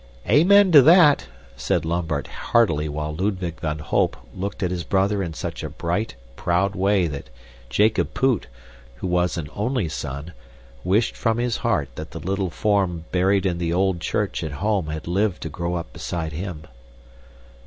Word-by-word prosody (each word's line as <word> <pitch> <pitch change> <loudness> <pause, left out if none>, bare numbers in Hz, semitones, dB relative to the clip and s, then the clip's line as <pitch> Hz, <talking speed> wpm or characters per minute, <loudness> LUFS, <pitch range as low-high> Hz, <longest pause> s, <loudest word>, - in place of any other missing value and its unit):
"Amen 185 - +6
to 150 -4 +10
that!" 155 0 +6 0.3
said - - -1
Lambert 80 -4 -1
heartily 80 -10 +1
while 75 +1 -3
Ludwig 90 -2 -2
van 75 -1 -2
Holp 75 - 0 0.2
looked 100 +2 -4
at 90 - 0
his 90 -2 -3
brother 100 +4 +1
in 85 -4 -4
such - - -5
a - - -4
bright, 90 - -2 0.2
proud 90 +6 +1
way 95 -1 +2
that 70 -6 -5 0.4
Jacob 90 - +2
Poot, 130 -3 +1 0.5
who - - -7
was 90 0 +1
an 80 -3 -4
only 110 -2 0
son, 75 +1 -5 0.5
wished 105 +5 +1
from 115 -1 0
his 120 -1 0
heart 110 - 0
that - - -6
the - - -8
little 95 +1 -2
form 95 -4 0
buried 95 +2 +2
in 90 -2 0
the 85 -1 -1
old 95 0 +1
church - - -1
at 75 - -4
home 95 +3 0
had 80 0 -5
lived 95 +2 0
to 80 - -4
grow 85 +3 -3
up 85 - -5
beside 80 -2 -4
him. 85 -1 -5
90 Hz, 170 wpm, -23 LUFS, 80-105 Hz, 0.5 s, to